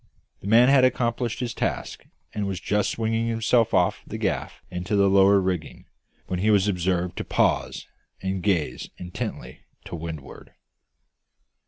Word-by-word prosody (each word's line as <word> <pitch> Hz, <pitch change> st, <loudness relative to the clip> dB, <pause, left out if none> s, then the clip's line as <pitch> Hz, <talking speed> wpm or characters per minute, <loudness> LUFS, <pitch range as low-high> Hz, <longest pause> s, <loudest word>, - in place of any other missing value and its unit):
The -, -, -9 dB
man 115 Hz, +4 st, +6 dB
had 135 Hz, -1 st, +5 dB
accomplished 120 Hz, -2 st, 0 dB
his 120 Hz, -2 st, -2 dB
task, -, -, -3 dB, 0.3 s
and 105 Hz, -1 st, -2 dB
was 95 Hz, -3 st, -3 dB
just 105 Hz, 0 st, 0 dB
swinging 115 Hz, 0 st, -1 dB
himself 115 Hz, 0 st, +2 dB
off 90 Hz, +3 st, +2 dB
the -, -, -5 dB
gaff -, -, -3 dB
into 90 Hz, +3 st, -2 dB
the 100 Hz, -1 st, +4 dB
lower 100 Hz, +1 st, +5 dB
rigging, 90 Hz, -4 st, -3 dB, 0.4 s
when 90 Hz, -, -3 dB
he 105 Hz, +4 st, +2 dB
was 100 Hz, -2 st, +4 dB
observed 90 Hz, -2 st, 0 dB
to -, -, -2 dB
pause -, -, 0 dB, 0.3 s
and 95 Hz, 0 st, -3 dB
gaze 90 Hz, -6 st, -1 dB
intently 90 Hz, 0 st, -6 dB, 0.3 s
to -, -, -6 dB
windward. 80 Hz, -4 st, -8 dB
100 Hz, 150 wpm, -25 LUFS, 90-115 Hz, 0.4 s, man